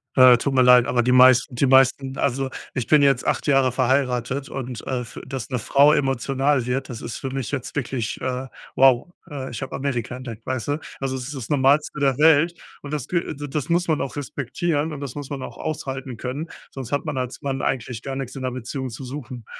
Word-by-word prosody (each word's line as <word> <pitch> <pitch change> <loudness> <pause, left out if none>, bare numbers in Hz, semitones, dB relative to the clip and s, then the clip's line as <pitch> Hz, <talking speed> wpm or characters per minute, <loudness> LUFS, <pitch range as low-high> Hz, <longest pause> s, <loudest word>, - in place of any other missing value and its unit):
Äh, 130 -2 +8
tut 140 +3 -2
mir 130 - +4
leid, 125 -1 +7
aber 120 +1 +2
die 125 +1 +1
meisten 130 +1 +6
die 130 - +2
meisten 135 0 +4
also, 135 0 0 0.3
ich 125 - -1
bin 150 -1 +5
jetzt 135 -3 +3
8 - - 0
Jahre 135 -2 +4
verheiratet 130 +1 0
und, 125 -3 -6
äh, 130 -2 -2
f 120 - -9
dass 130 -3 -5
'ne 125 - -1
Frau 140 +6 +5
emotional 135 0 +1
wird, 130 +2 -2
das 120 -3 -7
ist 120 -1 -5
für 135 - -4
mich 135 -3 -3
jetzt 135 -4 -4
wirklich, 125 -4 -3
äh, 130 0 -3 0.3
wow, 130 -2 +5 0.2
äh, 135 -3 -5
ich 115 - -6
hab 130 - -7
Amerika 130 -3 -2
entdeckt, 115 -3 -8
weißt 130 -3 -3
du? 145 +2 0 0.2
Also, 135 -1 -2
es 130 - -4
ist 150 - -6
das 125 -5 -7
Normalste 145 +2 +2
der 135 -3 +2
Welt 160 +2 +5 0.3
und 145 - -7
das 145 -5 -3
kü 170 -2 -1
d 145 +1 -6
das 145 0 -3
muss 175 +1 +2
man 155 -2 +1
auch 135 - -4
respektieren 145 +3 -2
und 145 - -6
das 140 -4 -6
muss 145 -2 -6
man 140 -2 -4
auch - - -8
aushalten 135 -5 -5
können, 135 +7 -4 0.2
sonst 130 -4 -7
hat 145 - -1
man 135 - -3
als 125 -1 -4
Mann 135 -2 -2
eigentlich 120 -2 -2
gar 135 -1 -4
nix 135 -1 -5
in 135 - -6
'ner 130 - -1
Beziehung 130 +2 -5
zu 120 +3 -8
suchen. 130 -3 -7
135 Hz, 230 wpm, -23 LUFS, 125-140 Hz, 0.3 s, Äh